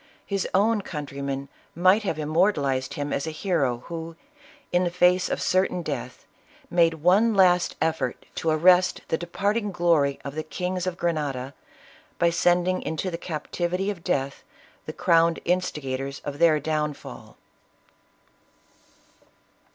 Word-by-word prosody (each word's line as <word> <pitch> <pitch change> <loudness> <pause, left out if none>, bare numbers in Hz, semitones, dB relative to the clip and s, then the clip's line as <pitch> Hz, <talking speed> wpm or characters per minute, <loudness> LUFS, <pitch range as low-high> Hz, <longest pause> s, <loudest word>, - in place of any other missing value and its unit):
his 195 -2 -2
own 210 +2 +3
countrymen 140 -4 -5 0.3
might 185 +5 +4
have 190 -7 -2
immortalized 150 -4 +1
him 145 0 -3
as 140 - -2
a - - -1
hero 155 -8 -1
who, 165 -1 -6 0.6
in 180 +1 +2
the 175 - +1
face 180 +1 +3
of - - -2
certain 185 -1 +1
death, 130 -4 -5 0.5
made 170 -2 +3
one 195 +8 +3
last 180 -2 +4
effort 160 0 -1
to 165 - -2
arrest 180 +3 +4
the 160 - +1
departing 200 +5 -1
glory 165 -6 +2
of 140 - -5
the 155 - -3
kings 180 +3 -3
of 180 -1 -3
Grenada, 145 -6 -2 0.6
by 170 0 +3
sending 180 +2 +2
into 160 +4 -3
the - - -3
captivity 175 +4 -2
of 175 -5 -9
death 140 -6 -2 0.4
the - - -5
crowned 165 0 +3
instigators 140 -7 -2
of 145 0 -5
their 165 -2 +5
downfall. 150 -1 -4
170 Hz, 135 wpm, -25 LUFS, 150-180 Hz, 0.6 s, their